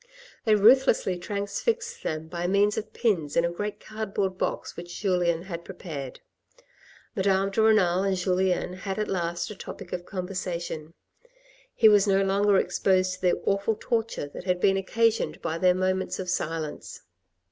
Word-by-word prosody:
They 215 -2 +5
ruthlessly 220 -4 +4
transfixed 445 - -2
them 155 0 -3
by 175 +1 -3
means 200 +2 +3
of 220 - -5
pins 175 -11 0
in 170 - +4
a 170 - -1
great 205 +4 -4
cardboard 200 -3 -3
box - - -3
which 175 0 -8
Julien 175 -4 +1
had 170 -3 -6
prepared. 155 -8 -7 0.9
Madame 195 -1 +2
de 220 - +1
Renal 195 -5 +4
and 195 -1 0
Julien 180 0 0
had 190 +1 -5
at 215 - -1
last 175 0 -2
a - - -7
topic 190 -1 -9
of 175 0 -5
conversation; 175 -4 -5 0.8
he 220 - +6
was 205 -1 +5
no 195 0 +3
longer 200 +1 +3
exposed 185 -1 +2
to 185 - -10
the 180 -1 +3
awful 200 +2 +1
torture 225 - -2
that - - -9
had 180 -1 +1
been 195 +1 +3
occasioned 225 +4 +1
by 160 +1 -3
their 180 0 +4
moments 185 0 -1
of 180 -1 -3
silence. 160 -3 -4
190 Hz, 160 wpm, -26 LUFS, 175-205 Hz, 0.9 s, he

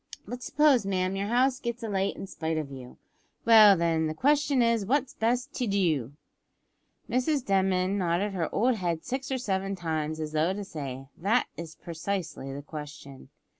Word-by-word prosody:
But 245 0 -6
suppose, 280 -1 +3
ma'am, 185 -1 -1
your 200 +1 -2
house 255 +3 +2
gets 235 0 -4
alight 195 -3 -1
in - - -6
spite 160 -4 -3
of 150 -3 -4
you 130 -2 -10 0.5
well 215 -4 +8
then, 165 -1 +1
the 155 - -4
question 285 - +3
is 230 -2 +2
what's 265 +5 0
best 245 +5 -1
to 245 - -2
do?" 160 - 0 0.9
Mrs 255 +3 0
Denman 190 0 +1
nodded 185 +3 0
her 170 -4 -2
old 240 +2 +2
head 170 -4 -2
six 265 +1 -4
or 265 - +1
seven 195 -5 -2
times, 160 -3 -3
as 155 -1 -4
though 155 +4 +1
to 205 +1 -5
say, 135 -8 -6
"That 210 +8 +2
is 165 -2 -8
precisely 170 -4 -4
the 140 +1 -7
question." 150 -3 -9
195 Hz, 170 wpm, -28 LUFS, 160-235 Hz, 0.9 s, well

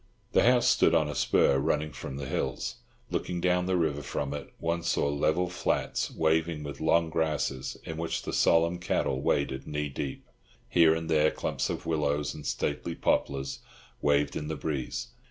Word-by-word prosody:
The - - +4
house 125 +1 +4
stood 85 - +4
on 80 -2 +3
a 75 - -3
spur 70 0 +3
running 75 +1 0
from 65 0 -7
the 70 - -4
hills. - - -2 0.3
Looking 90 -1 -2
down 90 0 +2
the 95 -1 +2
river 75 -4 0
from 70 0 -3
it, 75 - -6
one 85 +1 -1
saw 80 - +1
level 80 +5 +1
flats 90 - -1
waving 80 -1 +1
with 70 0 -7
long 80 +1 +3
grasses, 75 -5 -1
in 80 - -6
which 80 0 -2
the - - -4
solemn 85 +1 +3
cattle 70 -6 0
waded 65 -2 0
knee 75 -1 -2
deep. 70 0 -5 0.4
Here 80 -2 +5
and 80 0 -4
there 80 -1 +4
clumps - - -2
of - - -4
willows 75 -2 0
and 75 - -7
stately - - -2
poplars 70 -1 0 0.4
waved 70 0 +2
in 75 - -3
the 80 - -2
breeze. 70 -4 -3
75 Hz, 175 wpm, -29 LUFS, 70-85 Hz, 0.4 s, Here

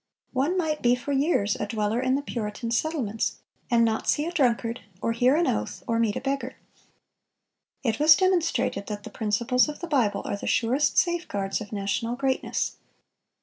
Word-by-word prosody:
One 285 +8 +1
might 310 -4 -1
be 245 0 +4
for 250 +3 -5
years 270 - +2
a - - -3
dweller 220 +1 -1
in 260 0 +2
the 285 - -2
Puritan 230 -2 -4
settlements, 235 -5 -1 0.3
"and 235 -1 +4
not 220 -1 -1
see 295 - +2
a 340 - -3
drunkard, 235 - +1 0.2
or 230 - 0
hear 245 +4 +3
an 340 +2 +2
oath, 105 - -2
or 230 0 +1
meet 225 -3 +1
a - - -3
beggar."(448) 270 -1 -2 1.4
It - - -7
was 310 +1 +8
demonstrated 260 - +1
that 205 -1 -5
the 220 - -9
principles 235 +6 +1
of 295 - -7
the 345 - -4
Bible 230 -10 +1
are - - -2
the - - -6
surest 255 +6 +1
safeguards 230 - 0
of 210 - -8
national 210 +3 -2
greatness. 265 0 -1
245 Hz, 180 wpm, -26 LUFS, 215-285 Hz, 1.4 s, was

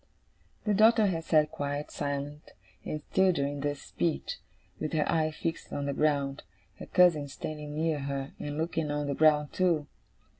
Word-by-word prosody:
The 210 - +2
daughter 220 +2 +6
had 165 -4 -1
sat 155 -1 +3
quite 145 +1 -3
silent 145 +1 -4 0.3
and 155 0 -4
still 190 -1 +5
during 145 -3 -1
this 145 0 -2
speech, 165 -2 -2 0.4
with 155 - -3
her 155 -2 +1
eyes 155 -1 +1
fixed 165 -1 -4
on 140 - -2
the 140 - -1
ground; 140 -2 +1 0.4
her - - -8
cousin 170 -5 +4
standing 150 +1 -6
near 160 -1 0
her, 140 0 -3
and 145 0 -4
looking 160 -1 -1
on 145 0 -1
the 140 - -1
ground 150 0 +3
too. 170 -5 +2
150 Hz, 165 wpm, -29 LUFS, 145-165 Hz, 0.4 s, daughter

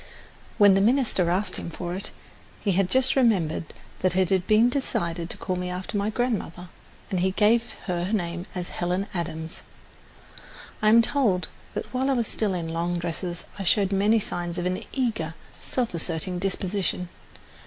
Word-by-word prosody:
When 205 -3 +7
the 195 - +4
minister 225 -6 +3
asked 185 +2 0
him - - -5
for 175 +1 -5
it, 190 +3 -3 0.5
he 200 - 0
just 260 +7 +3
remembered 190 - +2 0.3
that 185 -1 +2
it 185 -1 +3
had 185 -1 +2
been 215 +2 +6
decided 170 -10 -1
to - - -4
call 185 - -2
me 180 0 -3
after 180 +3 -5
my 205 +1 +1
grandmother, 215 -7 -2 0.4
and 185 - +1
he 185 +2 +2
gave 225 +4 +3
her 180 0 -1
name 175 -3 -2
as 180 -1 -3
Helen 180 +2 -1
Adams. 160 -2 -4 1.2
I 215 - +5
am 230 +2 +7
told 225 -9 +1 0.3
that - - -2
while 260 +2 +1
I - - +4
was 240 -3 +1
still 205 -3 -1
in 165 -2 -3
long 170 +2 -1
dresses 175 +1 -4 0.2
I - - -2
showed 195 +1 +3
many 205 +3 +4
signs 175 -3 -3
of 175 - -2
an 180 0 -1
eager, 220 - -1 0.3
self 245 -6 -1
asserting 170 +2 -2
disposition. 190 -1 -1
185 Hz, 170 wpm, -26 LUFS, 175-215 Hz, 1.2 s, When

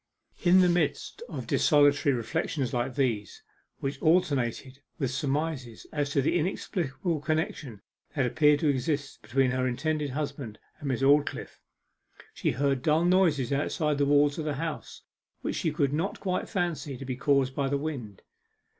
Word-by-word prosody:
In 185 +1 +6
the 180 - +5
midst 175 - -1
of - - -5
desultory 145 -2 +4
reflections 130 +2 -2
like 120 +1 -1
these, 120 -7 -1 0.4
which 135 0 -3
alternated 140 -5 +1 0.2
with 135 -6 -1
surmises 135 -3 -3
as 145 -2 -1
to 140 -1 +1
the 175 - +2
inexplicable 170 -2 -2
connection 155 - -3 0.3
that 140 -4 +2
appeared 150 +3 +3
to 155 - +2
exist 140 +1 -1
between 130 +1 +1
her 130 0 0
intended 150 +3 -1
husband 140 -5 -4 0.2
and 145 - -6
Miss 130 0 -1
Aldclyffe, 145 +2 +2 0.7
she - - -1
heard 135 -1 0
dull 155 +4 +2
noises 165 -8 +3
outside 150 +1 0
the 140 - +2
walls 145 +1 +3
of 155 - -3
the 150 -2 -1
house, 160 +2 -5 0.4
which - - -3
she 160 - 0
could 145 -3 0
not 170 +7 -2
quite 185 -2 -2
fancy 170 - -2
to 135 - -8
be 130 -1 -3
caused 135 0 +2
by 135 0 -1
the 140 - +1
wind. 135 -9 -6
145 Hz, 160 wpm, -28 LUFS, 135-155 Hz, 0.7 s, In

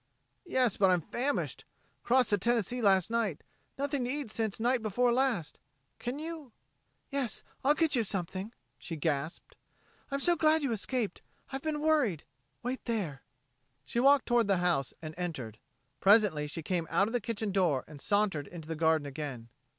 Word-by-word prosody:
"Yes, 255 - +2
but 195 -2 +5
I'm 180 -2 +3
famished. 270 - -2 0.4
Crossed 250 -1 +3
the 205 - +3
Tennessee 240 +2 0
last 195 -2 +4
night 220 -9 0 0.3
nothing 280 -2 -1
to - - -3
eat 280 -4 -3
since 220 -2 -1
night 245 +2 +2
before 235 +3 +2
last. 240 - 0 0.4
Can 245 +3 -3
you...?" 310 -5 -7 0.6
"Yes, 275 -4 -1 0.2
I'll 290 +3 +5
get 320 -2 +2
you 235 - +2
something," 195 +1 -3 0.3
she 165 - -6
gasped. 155 +1 -2 0.5
"I'm 275 0 -1
so 345 +4 +4
glad 315 -1 +3
you 275 - 0
escaped. 225 -1 -2 0.3
I've 270 0 -4
been 305 -1 -2
worried.... 295 - +2 0.4
Wait 255 +2 -3
there." 190 - -2 0.6
She 235 - -1
walked 275 +2 +5
toward 240 -3 +3
the 195 -2 +3
house 175 -7 +1
and 155 0 -5
entered. 130 -12 -4 0.4
Presently 195 -8 +4
she 160 +2 -5
came 170 -1 -1
out 175 +4 +3
of 225 - -5
the 245 - +1
kitchen 220 -1 -3
door 175 -9 +2
and 150 -2 -10
sauntered 200 -9 +1
into 165 -3 -9
the 160 - -3
garden 160 -1 +2
again. 135 -5 -6
215 Hz, 170 wpm, -31 LUFS, 170-255 Hz, 0.6 s, but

